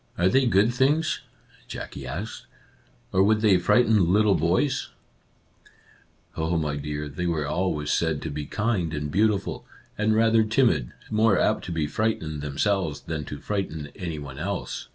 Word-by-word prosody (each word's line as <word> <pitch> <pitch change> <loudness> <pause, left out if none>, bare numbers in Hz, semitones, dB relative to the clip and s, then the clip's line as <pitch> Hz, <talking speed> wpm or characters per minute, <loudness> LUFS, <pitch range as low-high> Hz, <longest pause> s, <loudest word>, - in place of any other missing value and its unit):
"Are 90 +2 +3
they 130 +2 +3
good 110 +2 +3
things? 145 +6 +1 0.2
" - - -28
Jackie 65 - -7
asked, 85 +12 -6 0.3
" - - -35
or 95 - +4
would 105 +2 +3
they 100 -5 +5
frighten 105 -1 +3
little 105 +1 +4
boys? 85 - +1 0.5
" - - -30
" - - -34
Oh, 80 +2 0
my 75 -3 -1
dear, 75 +1 -4
they 80 +5 -3
were 80 -3 -1
always 75 -2 -1
said 80 -3 +1
to 80 - -4
be 75 0 -5
kind 100 -8 -1
and 75 0 -3
beautiful, 105 +2 +1 0.4
and 110 0 +2
rather 115 0 +4
timid, 110 - +2 0.2
more 110 -2 +3
apt - - +1
to 90 - -5
be 80 -2 0
frightened 80 -4 -2
themselves 75 0 -1
than 80 -2 -4
to 75 - -6
frighten 80 -4 -4
any 85 -4 -5
one 70 -2 -8
else. 100 +4 -4
90 Hz, 175 wpm, -25 LUFS, 75-110 Hz, 0.5 s, they